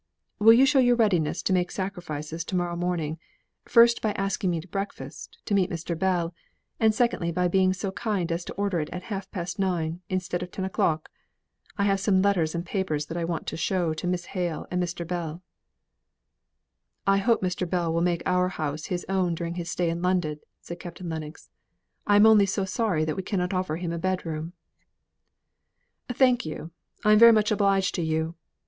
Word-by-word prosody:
"Will 225 Hz, +2 st, +8 dB
you 255 Hz, +4 st, +6 dB
show 275 Hz, 0 st, +4 dB
your 245 Hz, -1 st, +5 dB
readiness 190 Hz, -10 st, +1 dB
to 190 Hz, -, +1 dB
make 180 Hz, -1 st, +1 dB
sacrifices 165 Hz, -5 st, -4 dB
to 185 Hz, -, -4 dB
morrow 175 Hz, -1 st, -1 dB
morning, 170 Hz, -3 st, -2 dB, 0.5 s
first 235 Hz, 0 st, +5 dB
by 215 Hz, -2 st, 0 dB
asking 195 Hz, -1 st, -1 dB
me 170 Hz, -2 st, 0 dB
to 165 Hz, -, -10 dB
breakfast, 170 Hz, -7 st, -6 dB
to -, -, -2 dB
meet 190 Hz, -2 st, +3 dB
Mr. 170 Hz, -2 st, -4 dB
Bell, 175 Hz, -1 st, 0 dB, 0.5 s
and 220 Hz, -1 st, +5 dB
secondly, 230 Hz, -8 st, +1 dB
by 180 Hz, +1 st, +1 dB
being 185 Hz, +1 st, +3 dB
so 190 Hz, +1 st, -3 dB
kind 190 Hz, -5 st, -2 dB
as 170 Hz, +1 st, -2 dB
to -, -, -6 dB
order 200 Hz, -3 st, -1 dB
it 150 Hz, -, -3 dB
at 180 Hz, 0 st, -6 dB
half 195 Hz, -1 st, -5 dB
past 175 Hz, 0 st, -5 dB
nine, 175 Hz, -3 st, -1 dB
instead 180 Hz, -1 st, -2 dB
of 180 Hz, -, -4 dB
at -, -, -30 dB
ten 190 Hz, -, -3 dB
o'clock? 160 Hz, -4 st, 0 dB, 0.7 s
I 200 Hz, -, +1 dB
have 195 Hz, -1 st, +2 dB
some 195 Hz, -1 st, +2 dB
letters 180 Hz, -5 st, +1 dB
and 170 Hz, +1 st, -3 dB
papers 175 Hz, -6 st, -2 dB
that 165 Hz, -, -7 dB
I 170 Hz, -, -2 dB
want 165 Hz, -1 st, -3 dB
to -, -, -4 dB
show 170 Hz, -1 st, 0 dB
to 155 Hz, +3 st, -4 dB
Miss 180 Hz, 0 st, -1 dB
Hale 175 Hz, -5 st, -2 dB
and 180 Hz, 0 st, 0 dB
Mr. 170 Hz, -1 st, -3 dB
Bell." 170 Hz, 0 st, -4 dB, 1.6 s
"I 195 Hz, 0 st, +4 dB
hope 225 Hz, +1 st, +2 dB
Mr. 180 Hz, -1 st, -1 dB
Bell 170 Hz, -2 st, 0 dB
will 165 Hz, -, +1 dB
make 175 Hz, -1 st, 0 dB
our 180 Hz, 0 st, +2 dB
house 155 Hz, -4 st, -4 dB
his 180 Hz, -1 st, -3 dB
own 185 Hz, -3 st, +1 dB
during 170 Hz, 0 st, -4 dB
his 175 Hz, -1 st, -5 dB
stay 175 Hz, -2 st, 0 dB
in 170 Hz, +1 st, -4 dB
London," 175 Hz, -5 st, 0 dB, 0.2 s
said 170 Hz, 0 st, -8 dB
Captain 175 Hz, 0 st, -7 dB
Lennox. 160 Hz, -1 st, -7 dB, 0.6 s
"I 205 Hz, -, +5 dB
am 205 Hz, +1 st, +7 dB
only 215 Hz, -3 st, +6 dB
so 195 Hz, 0 st, -1 dB
sorry 185 Hz, -5 st, 0 dB
we 155 Hz, +4 st, -2 dB
cannot 180 Hz, -1 st, -2 dB
offer 185 Hz, -4 st, -1 dB
him 170 Hz, 0 st, -3 dB
a 170 Hz, -, -3 dB
bedroom." 170 Hz, -3 st, -3 dB, 1.6 s
"Thank 250 Hz, 0 st, +3 dB
you. 160 Hz, +1 st, -6 dB, 0.3 s
I 210 Hz, -, +6 dB
am 230 Hz, +1 st, +8 dB
much 215 Hz, 0 st, +2 dB
obliged 195 Hz, -2 st, +2 dB
to 175 Hz, -, -2 dB
you. 160 Hz, 0 st, -1 dB
180 Hz, 195 wpm, -26 LUFS, 165-195 Hz, 1.6 s, Will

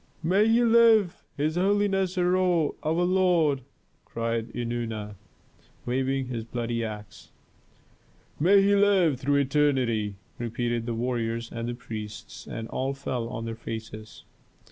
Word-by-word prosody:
"May 195 Hz, +6 st, +3 dB
he 230 Hz, +2 st, +4 dB
live, 225 Hz, -5 st, +5 dB, 0.2 s
his 155 Hz, +3 st, 0 dB
holiness 195 Hz, -1 st, +1 dB
Herhor, 180 Hz, -3 st, +2 dB
our 155 Hz, -, -1 dB
lord!" 175 Hz, -6 st, +2 dB, 0.4 s
cried 115 Hz, 0 st, -3 dB
Eunana, 115 Hz, -3 st, -4 dB, 0.7 s
waving 130 Hz, +2 st, 0 dB
his 120 Hz, -3 st, -4 dB
bloody 115 Hz, 0 st, -3 dB
axe. 105 Hz, -2 st, -8 dB, 1.1 s
"May 195 Hz, +6 st, +5 dB
he 200 Hz, +1 st, +4 dB
live 190 Hz, -9 st, +3 dB
through 140 Hz, +2 st, +1 dB
eternity!" 130 Hz, -7 st, +1 dB, 0.2 s
repeated 120 Hz, 0 st, -2 dB
the 115 Hz, -, -2 dB
warriors 115 Hz, -1 st, -2 dB
and 120 Hz, +1 st, -4 dB
priests, 110 Hz, -3 st, -8 dB
and 115 Hz, 0 st, -5 dB
all 135 Hz, +1 st, -2 dB
fell 125 Hz, -4 st, -3 dB
on 115 Hz, -2 st, -5 dB
their 115 Hz, -, -4 dB
faces. 110 Hz, -1 st, -8 dB
130 Hz, 120 wpm, -26 LUFS, 115-180 Hz, 1.1 s, live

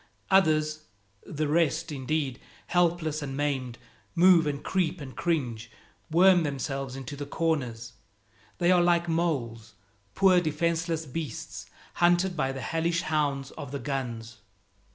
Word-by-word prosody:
Others 155 Hz, -4 st, +3 dB, 0.4 s
the 155 Hz, 0 st, -2 dB
rest, 165 Hz, +1 st, +1 dB
indeed 140 Hz, -1 st, -2 dB, 0.3 s
helpless 170 Hz, -3 st, +1 dB
and 135 Hz, -2 st, -5 dB
maimed, 135 Hz, -4 st, -2 dB, 0.4 s
move 175 Hz, -2 st, +6 dB
and 140 Hz, -1 st, -3 dB
creep 180 Hz, -2 st, 0 dB
and 135 Hz, -3 st, -9 dB
cringe, 120 Hz, -9 st, -2 dB, 0.4 s
worm 180 Hz, +2 st, +6 dB
themselves 135 Hz, -3 st, -3 dB
into 135 Hz, +1 st, -7 dB
the 145 Hz, 0 st, -6 dB
corners. 125 Hz, -8 st, -2 dB, 0.6 s
They 175 Hz, +1 st, +3 dB
are 180 Hz, -1 st, +5 dB
like 175 Hz, 0 st, +2 dB
moles, 120 Hz, -10 st, -2 dB, 0.4 s
poor, 185 Hz, -2 st, +5 dB
defenseless 165 Hz, +1 st, -1 dB
beasts, 145 Hz, -3 st, -6 dB, 0.3 s
hunted 175 Hz, +1 st, +3 dB
by 135 Hz, -4 st, 0 dB
the 135 Hz, 0 st, -6 dB
hellish 170 Hz, +1 st, -1 dB
hounds 145 Hz, -3 st, -1 dB
of 140 Hz, -2 st, -8 dB
the 140 Hz, -, -3 dB
guns. 120 Hz, -4 st, -4 dB
155 Hz, 130 wpm, -27 LUFS, 135-170 Hz, 0.6 s, move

